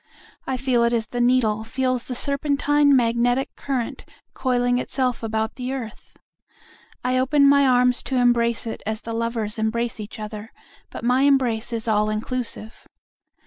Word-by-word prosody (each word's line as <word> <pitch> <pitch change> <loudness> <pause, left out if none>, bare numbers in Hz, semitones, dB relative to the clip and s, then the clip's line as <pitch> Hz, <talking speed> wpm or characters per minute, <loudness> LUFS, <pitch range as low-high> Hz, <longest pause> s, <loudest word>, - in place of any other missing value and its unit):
I 260 - -1
feel 250 -2 +1
it 235 0 +2
as 230 -2 0
the 245 +2 -3
needle 240 -3 +2
feels 255 +1 -1
the 250 - -5
serpentine 285 +1 +2
magnetic 245 +2 +1
current 260 -4 -3 0.3
coiling 245 -1 +1
itself 250 -1 -1
about 220 0 -2
the 255 +1 -3
earth.I 255 +1 -7
open 280 +2 +4
my 280 0 +5
arms 250 -1 +3
to 265 - -1
embrace 235 -2 +2
it 225 - -5
as 220 +1 -3
the 230 - -6
lovers 225 -2 -2
embrace 230 +2 -1
each 215 +1 -8
other, 215 +1 -7 0.4
but - - -8
my 250 +2 +2
embrace 255 -5 +2
is 230 0 -3
all 210 -1 +2
inclusive. 220 0 -4
245 Hz, 150 wpm, -23 LUFS, 225-260 Hz, 0.4 s, my